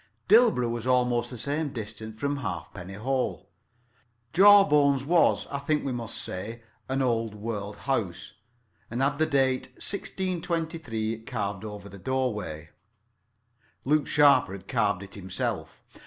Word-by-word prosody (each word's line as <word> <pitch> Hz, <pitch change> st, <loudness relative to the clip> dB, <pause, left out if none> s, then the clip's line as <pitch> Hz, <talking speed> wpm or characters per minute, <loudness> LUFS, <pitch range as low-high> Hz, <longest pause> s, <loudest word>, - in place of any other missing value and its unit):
Dilborough 215 Hz, -, +5 dB
was 120 Hz, +1 st, -4 dB
almost 125 Hz, -1 st, +2 dB
the 125 Hz, -, -7 dB
same 145 Hz, +6 st, -2 dB
distance 110 Hz, -2 st, -7 dB
from 145 Hz, 0 st, -1 dB
Halfpenny 95 Hz, -4 st, -6 dB
Hole. 130 Hz, +5 st, -2 dB, 0.9 s
Jawbones 150 Hz, -8 st, +6 dB
was, 170 Hz, +3 st, +3 dB
I 140 Hz, -, -2 dB
think 150 Hz, +2 st, 0 dB
we 135 Hz, -, -1 dB
must 120 Hz, -3 st, -4 dB
say, 110 Hz, +5 st, -6 dB, 0.3 s
an 135 Hz, +1 st, +1 dB
old 115 Hz, -3 st, 0 dB
world 105 Hz, -1 st, -4 dB
house, 95 Hz, -8 st, -2 dB, 0.6 s
and 120 Hz, -, -4 dB
had 145 Hz, +2 st, +1 dB
the 160 Hz, -, +3 dB
date 135 Hz, -3 st, +1 dB
1623 165 Hz, -, -3 dB
carved 105 Hz, -4 st, -4 dB
over 105 Hz, -2 st, -7 dB
the 100 Hz, 0 st, -11 dB
doorway. 105 Hz, -, -2 dB, 1.1 s
Luke 150 Hz, +2 st, +2 dB
Sharper 145 Hz, -9 st, +5 dB
had 95 Hz, -, -9 dB
carved 100 Hz, -2 st, +1 dB
it 100 Hz, -, -12 dB
himself. 95 Hz, -2 st, -4 dB
125 Hz, 130 wpm, -27 LUFS, 105-145 Hz, 1.1 s, Jawbones